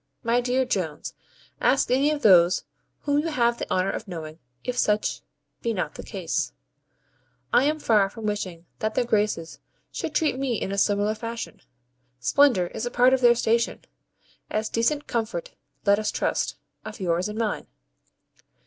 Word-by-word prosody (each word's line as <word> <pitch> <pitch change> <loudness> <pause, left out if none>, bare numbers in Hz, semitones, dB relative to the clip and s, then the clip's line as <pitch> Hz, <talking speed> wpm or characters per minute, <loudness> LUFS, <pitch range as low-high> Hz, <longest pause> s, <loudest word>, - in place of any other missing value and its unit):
My 235 +1 +2
dear 255 +1 +1
Jones, 165 -10 -3 0.5
ask 270 - +2
any 270 +3 +4
of 300 -2 -2
those 180 -4 +6 0.4
whom 285 0 +1
you 310 - -1
have 240 -6 +1
the - - -4
honour 185 +1 +1
of 220 - -6
knowing, 160 -3 -7 0.2
if 250 - -3
such 210 -3 +1 0.4
be 230 -1 -1
not 185 - -2
the - - -8
case. - - -3 1.0
I 255 - +5
am 305 +1 +2
far 210 -8 +3
from 220 +2 -8
wishing 185 -5 -3
that 215 0 -2
their 245 - +2
Graces 205 -7 0 0.3
should 305 - -4
treat 300 -5 +1
me 255 -5 0
in 195 - -3
a 200 - -2
similar 205 +1 +2
fashion. 230 +1 -6 0.6
Splendour 245 - +4
is 235 - -3
a - - -1
part 250 +2 +4
of 265 - +2
their 240 -1 +6
station, 230 0 0 0.7
as 215 0 -1
decent 285 +6 +1
comfort 240 - -3 0.3
(let 200 0 +5
us 215 - -1
trust), - - -1 0.3
of 215 0 -8
yours 180 +1 0
and 210 - -6
mine. 225 -2 -2
225 Hz, 165 wpm, -25 LUFS, 200-250 Hz, 1.0 s, those